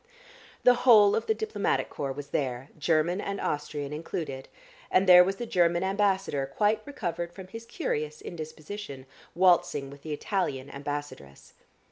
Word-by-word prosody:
The 250 - +7 0.2
whole 210 -3 +8
of - - -2
the 440 - +2
diplomatic 440 0 -1
corps 140 -2 -3
was 145 +1 -7
there, 130 0 -2
German 165 +4 +1
and 200 0 -4
Austrian 145 -1 -3
included, 150 -3 -5 0.4
and 185 - +3
there 180 -1 +10
was 195 +2 -1
the 240 - -5
German 175 -4 +2
ambassador, 190 -7 0
quite 210 +10 +1
recovered 175 - -4
from 190 +1 -10
his 225 +3 -9
curious 155 - -3
indisposition, 155 -2 -8 0.3
waltzing 175 -6 +3
with 140 0 -13
the 155 - -7
Italian 145 -5 -2
ambassadress. 140 - -7
170 Hz, 145 wpm, -28 LUFS, 145-195 Hz, 0.4 s, there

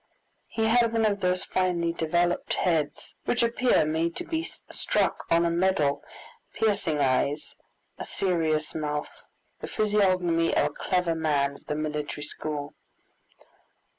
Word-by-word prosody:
He 225 -1 -1
had 230 0 +3
one 225 -1 +2
of 205 -1 +1
those 180 -1 +1
finely 175 -2 0
developed 175 +2 0
heads 160 -4 -1
which 245 - +1
appear 235 -6 +3
made 160 +2 0
to - - -3
be 325 -1 -1
struck - - -2
on 170 +1 +4
a 170 - +1
medal, 170 -5 +1 0.5
piercing 200 -8 +1
eyes, 140 +2 0 0.4
a - - -4
serious 160 -5 0
mouth, 150 -1 -4 0.4
the - - -6
physiognomy 185 -6 +2
of - - +4
a - - +1
clever 180 -2 0
man 145 -3 0
of - - -26
the 150 - -1
military 150 -1 -3
school. 150 -1 -4
170 Hz, 135 wpm, -27 LUFS, 150-190 Hz, 0.5 s, on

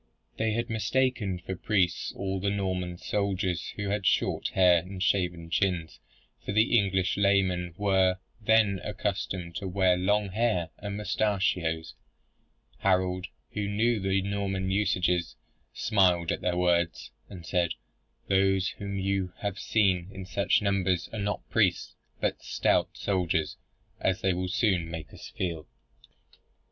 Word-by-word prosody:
They 110 -1 +1
had 115 +1 -1
mistaken 115 -3 0
for 95 +2 -6
priests 95 -4 0
all 95 -1 -2
the 100 +2 0
Norman 95 -3 -2
soldiers 95 -3 -1
who 100 -1 -3
had 100 -1 0
short - - +1
hair 90 -2 +5
and 95 +3 -8
shaven 85 -3 0
chins; 90 -4 0 0.4
for - - -3
the 110 +3 +3
English 95 -4 +2
layman 95 -4 +2
were 95 -2 +3 0.2
then 105 -3 +3
accustomed 85 -3 -3
to 95 - -4
wear 95 -1 +3
long 105 +2 +1
hair 95 -5 0
and 100 -1 -5
mustachios, 95 -6 0 0.9
Harold, 90 0 +1 0.2
who 105 -1 -2
knew 110 +2 +2
the 95 0 +1
Norman 95 -1 -2
usages, 90 -4 +1 0.4
smiled 90 -5 +2
at - - -2
their 90 -1 0
words 85 -1 +1 0.2
and 90 -4 -10
said, 90 -2 +1 0.6
"Those 95 -1 +3
whom 100 -1 -4
you 95 -1 -1
have 100 -1 -3
seen 95 -5 +2
in 95 -1 -8
such 100 +3 +1
numbers 95 -3 +1
are 110 - -3
not 100 +1 -3
priests, - - +2 0.3
but - - -1
stout - - +1
soldiers, 90 -5 0 0.4
as 95 0 0
they 95 -1 +2
will 90 +1 -2
soon 95 -5 +1
make 80 -2 -7
us - - -10
feel." 85 -5 -4
95 Hz, 140 wpm, -28 LUFS, 90-100 Hz, 0.9 s, hair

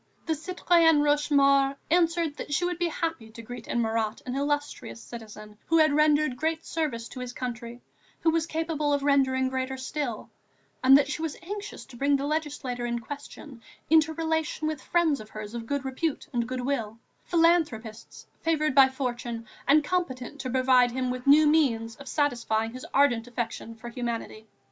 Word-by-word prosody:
The 320 - +1
citoyenne 330 -1 +3
Rochemaure 280 -2 +3 0.2
answered 335 -3 +2
that - - -7
she 350 - +1
would 355 -1 -2
be 350 - +1
happy 325 -8 -3
to 225 +1 -10
greet 245 +1 -9
in 240 - 0
Marat 220 -1 -1
an 250 - -4
illustrious 290 -3 -2
citizen, 215 -3 -11
who 330 - +3
had 310 -2 +5
rendered 300 -3 +3
great 320 +3 -1
services 265 -9 -2
to - - -9
his 250 -1 -6
country, 240 -1 -6 0.4
who 325 - +3
was 330 0 0
capable 315 -3 -1
of 285 -1 0
rendering 265 -2 +3
greater 260 0 -3
still, 260 -3 -4 0.5
and 265 +1 +8
that 280 - +2
she 300 +2 -4
was 320 -3 -3
anxious 410 +3 -7
to 265 - -14
bring 280 +3 +2
the 275 0 -1
legislator 290 -5 -3
in 235 0 -1
question 280 0 -9 0.3
into 320 0 +5
relation 320 -1 -1
with 310 -3 -3
friends 330 -5 +1
of 215 - -11
hers 215 0 -8
of 230 -1 -6
good 280 0 -2
repute 270 +3 -2
and 235 -1 0
good 255 0 -3
will, 235 -5 -2 0.3
philanthropists 310 -11 0 0.2
favoured 305 -2 +1
by 265 0 +7
fortune 240 -3 -4 0.2
and 300 +2 +5
competent 290 -6 -3
to 255 - -4
provide 255 -1 +4
him 255 +1 -2
with 255 +1 -6
new 300 +2 +7
means 245 -7 +2
of 280 - -12
satisfying 230 -6 0
his 255 - -8
ardent 245 -4 +3
affection 230 -1 -5
for 235 +2 -9
humanity. 235 -2 -5
275 Hz, 175 wpm, -27 LUFS, 240-310 Hz, 0.5 s, and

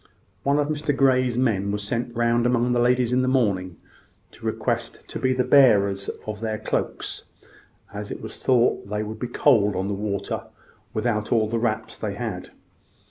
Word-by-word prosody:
One 140 +1 +2
of 145 -1 +1
Mr 150 -2 -1
Grey's 130 -3 +3
men 100 -6 +1
was 105 0 -3
sent 120 +3 -3
round 120 +1 +2
among 125 0 +2
the 120 - +2
ladies 125 0 +2
in 125 - +3
the 130 - 0
morning, 100 -9 +1 0.5
to - - -8
request - - -2
to - - -5
be 130 - +1
the 130 0 +1
bearer 110 -8 +5 0.3
of 105 -1 -5
their 110 -1 -2
cloaks, - - -3 0.7
as 105 0 -6
it - - -5
was 110 0 -8
thought 120 -5 +2
they 105 +1 -1
would 110 +1 -7
be 125 - -3
cold 115 -5 +3
on 95 +1 -1
the - - -1
water 100 0 -3 0.5
without 110 -1 -1
all 110 -2 +3
the 115 +1 -1
wraps 110 -1 -2
they - - -3
had. - - -5
115 Hz, 185 wpm, -24 LUFS, 105-125 Hz, 0.7 s, bearer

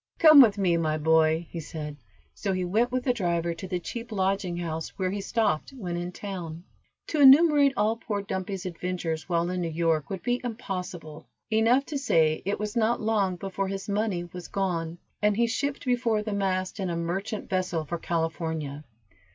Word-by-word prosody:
"Come 310 -3 +9
with 215 -5 +5
me, 180 -4 +2
my 155 -2 0
boy," 160 +1 +3
he 170 - -5
said, 150 -2 -6 0.4
so 195 -2 -2
he 185 -1 -1
went 225 +7 +1
with 255 0 -1
the 250 - +2
driver 170 -5 -1
to 180 +3 -8
the 180 -1 -2
cheap 230 +7 -7
lodging 190 -3 0
house, 165 -2 -3
where 185 -1 0
he 200 0 -3
stopped 220 - 0
when 180 -7 -4
in 175 +1 -4
town. 175 -4 -6 0.5
To 305 - +1
enumerate 285 0 +7
all 215 +2 +2
poor 205 -3 -3
Dumpy's 190 0 -4
adventures 175 -2 -3
while 170 -1 +1
in 180 0 -2
New 170 - -1
York 160 -3 0
would 190 - -5
be 245 0 0
impossible. 180 -9 -6 0.2
Enough 230 +5 +3
to 285 -2 -3
say 160 - +2
it 200 - 0
was 210 0 -4
not 230 0 +2
long 210 -4 +1
before 195 +1 -3
his 195 0 -5
money 205 -3 -1
was 175 0 -9
gone, 170 -4 -2 0.2
and 210 0 +2
he 235 - +4
shipped 280 +5 -2
before 240 -4 +1
the 210 -1 -3
mast 190 -1 -1
in 190 -2 -1
a 170 - -2
merchant 190 +5 -3
vessel 185 -4 -1
for 170 +3 -4
California. 160 -3 -3
185 Hz, 190 wpm, -27 LUFS, 170-220 Hz, 0.5 s, Come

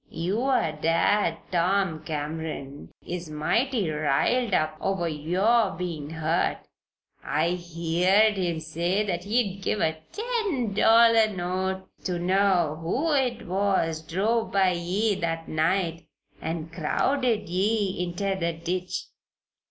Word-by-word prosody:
Your 195 - 0
dad, 165 +6 +2
Tom 180 -2 +1
Cameron, 150 -2 -5 0.2
is 175 -2 -5
mighty 215 - 0
riled 155 - +1
up 155 -3 +1
over 190 -3 0
your 190 +8 +2
bein' 165 -5 -4
hurt. 160 +1 0 0.7
I 155 +3 +1
heered 175 +4 +2
him 175 -4 -1
say 170 +6 -1
that 175 -2 -3
he'd 205 -3 0
give 210 - -1
a 160 -2 0
ten 420 - -1
dollar 225 +1 +6
note 190 +1 -2 0.2
ter 180 -1 -1
know 180 -3 +2
who 275 - 0
it 250 -4 0
was 185 -4 0
drove 215 +8 0
by 190 -2 +3
ye 185 +5 0
that 165 -1 -2
night 165 0 0 0.3
and 165 0 -4
crowded 225 - 0
ye 195 +1 0
inter 180 +3 -2
the 170 -2 -1
ditch. 180 +3 -3
180 Hz, 120 wpm, -26 LUFS, 165-205 Hz, 0.7 s, dollar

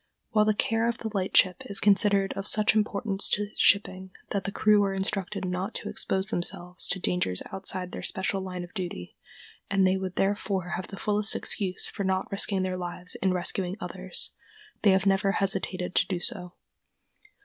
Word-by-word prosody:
While 215 -1 +4
the 215 -1 +2
care 225 -1 +1
of 235 - -2
the 220 - -5
lightship 185 -2 +3
is 200 -1 +3
considered 200 -1 +3
of 195 - -4
such 215 -1 +4
importance 210 -2 +2
to 205 +1 0
shipping 190 -2 +2 0.2
that 200 -2 -2
the 200 - -2
crew 210 0 +4
are 195 -1 -1
instructed 195 0 -2
not 185 +4 -3
to - - -4
expose 190 0 +1
themselves 175 +1 -1
to 190 - -1
dangers 180 - 0
outside 185 -1 -2
their - - -6
special 190 +1 -2
line 180 -1 -5
of 175 - -12
duty, 175 - -6 0.5
and 195 -1 +3
they 185 +1 +3
would 190 -1 -5
therefore 195 -2 -1
have 180 0 -4
the 195 - -9
fullest 210 +1 +2
excuse 190 -3 0
for 200 - -5
not 190 0 -1
risking 195 -1 +2
their 185 -1 -2
lives 180 0 -5
in 190 - +2
rescuing 180 +1 -2
others, 475 0 -4 0.5
they 210 - +5
have 190 0 +3
never 195 0 +2
hesitated 185 -2 -1
to 180 - +3
do 185 -3 -2
so. 175 0 -6
195 Hz, 180 wpm, -27 LUFS, 185-205 Hz, 0.5 s, they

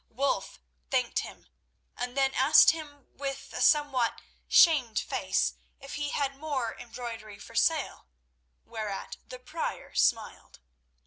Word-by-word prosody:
Wulf 270 +4 -2 0.3
thanked 250 -3 +1
him, - - -8 0.5
and 245 +2 -5
then 270 -1 +2
asked 285 +5 +7
him 295 -4 -9
with 275 -1 -5
a - - -4
somewhat 280 -6 +3 0.3
shamed 275 -11 +5
face - - 0 0.3
if 275 0 -10
he 290 0 -2
had 275 -2 -1
more 275 -6 -3
embroidery 230 -3 -8
for 205 - -13
sale, 300 - 0 0.6
whereat 215 -3 -5
the 255 - -8
Prior 305 +6 -5
smiled. - - 0
270 Hz, 125 wpm, -29 LUFS, 235-290 Hz, 0.6 s, asked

